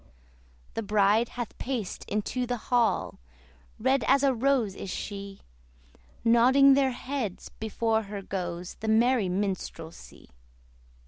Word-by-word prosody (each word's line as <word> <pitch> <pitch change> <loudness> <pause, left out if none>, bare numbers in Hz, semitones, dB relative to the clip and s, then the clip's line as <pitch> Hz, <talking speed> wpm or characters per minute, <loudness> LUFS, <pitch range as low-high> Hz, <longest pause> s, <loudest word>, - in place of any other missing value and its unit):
The - - -2
bride 210 +2 +2
hath 240 -3 -4
paced 240 -7 -4
into 245 +4 -2
the 245 0 -1
hall, 235 0 0 0.6
Red 260 +4 +1
as 280 - +4
a 275 -1 +4
rose 250 -4 +1
is 195 - -7
she; 200 +1 -6 0.8
Nodding 255 +4 +6
their 270 -1 +3
heads 250 -5 -4
before 220 0 0
her 200 -1 -6
goes 175 -2 -5
The 220 - -5
merry 225 -2 +3
minstrelsy. 180 - -5
225 Hz, 120 wpm, -27 LUFS, 200-255 Hz, 0.8 s, Nodding